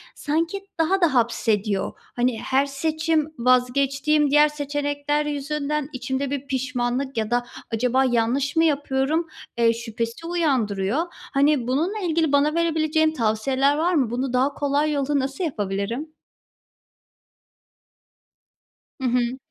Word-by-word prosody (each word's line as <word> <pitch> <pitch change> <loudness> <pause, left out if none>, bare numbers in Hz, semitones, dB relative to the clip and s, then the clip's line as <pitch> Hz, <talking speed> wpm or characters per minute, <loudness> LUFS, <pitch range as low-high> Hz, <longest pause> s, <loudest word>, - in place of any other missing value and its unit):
sanki 330 +6 -2
daha 370 +4 +2
da 340 -5 +3
hapsediyor. 215 -4 +1 0.2
Hani, 245 -2 0
her 270 +1 +1
seçim 315 +2 -1
vazgeçtiğim 275 +4 +2
diğer 295 +1 +6
seçenekler 290 0 -2
yüzünden 295 0 -2
içimde 265 +2 -3
bir 280 -1 -4
pişmanlık 260 -1 -2
ya 220 0 -1
da 245 0 +1 0.3
acaba 250 +3 +2
yanlış 250 +4 +1
mı 325 - +4
yapıyorum, 290 +1 +1 0.3
eee, 230 -1 +4
şüphesi 230 +5 -5
uyandırıyor. 260 - 0
Hani, 280 -3 0
bununla 330 +12 0
ilgili 330 -5 +1
bana 290 +2 +3
verebileceğin 315 -1 +2
tavsiyeler 260 +4 +1
var 340 +3 +1
mı? 270 -8 +2
Bunu 250 +2 -2
daha 260 +3 +2
kolay 290 +2 0
yolla 285 0 0
nasıl 270 +5 -3
yapabilirim? 230 - -3 2.9
Hı 260 - 0
hı. 245 +1 0
275 Hz, 120 wpm, -23 LUFS, 245-300 Hz, 2.9 s, diğer